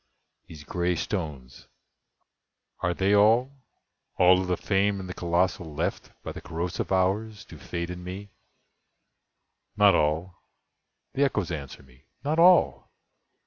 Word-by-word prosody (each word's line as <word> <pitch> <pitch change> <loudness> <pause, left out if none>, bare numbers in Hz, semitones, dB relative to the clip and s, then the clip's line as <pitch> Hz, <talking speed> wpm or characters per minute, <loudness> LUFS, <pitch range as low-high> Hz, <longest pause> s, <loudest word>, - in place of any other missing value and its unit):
these 75 -2 -11
gray 90 +2 -1
stones—are 75 -10 -5 1.3
they 95 +1 +1
all— 115 +6 +4 0.7
All 90 +1 +5
of 95 - -4
the 90 -1 0
famed, 100 0 0
and 95 - -7
the 90 - -6
colossal 85 -3 -1
left 85 +5 -3
By - - -5
the - - -9
corrosive 85 +3 -4
Hours 105 +3 0
to 80 - -13
Fate 85 +5 -5
and 90 0 -8
me? 95 +2 -8 1.5
"Not 105 -1 +6
all"—the 85 - -4
Echoes 105 -10 0
answer 70 -5 -7
me—"not 75 - -6
all! 180 +1 +4
90 Hz, 120 wpm, -26 LUFS, 85-100 Hz, 1.5 s, Not